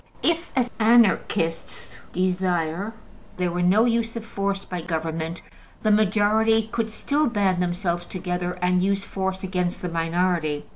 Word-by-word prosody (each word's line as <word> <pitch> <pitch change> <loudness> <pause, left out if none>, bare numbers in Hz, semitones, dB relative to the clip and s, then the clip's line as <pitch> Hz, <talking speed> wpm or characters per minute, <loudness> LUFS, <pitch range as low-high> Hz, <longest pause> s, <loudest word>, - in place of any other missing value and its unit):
If, 335 +1 +1
as 245 -1 +2
Anarchists 210 -7 +2
desire, 180 +1 0 0.5
there 180 -1 0
were 175 +1 -1
no 195 +6 +4
use 230 -1 0
of 230 -1 -5
force 200 -2 -2
by 180 -2 -4
government, 160 0 -3 0.4
the 215 - +3
majority 215 +1 +3
could 225 -1 -1
still 290 +7 0
band 195 -6 +1
themselves 175 -1 -1
together 180 -1 -3
and 180 0 +3
use 195 +1 0
force 190 0 -3
against 180 -2 -2
the 180 - -1
minority. 165 -2 0
185 Hz, 140 wpm, -24 LUFS, 175-215 Hz, 0.5 s, no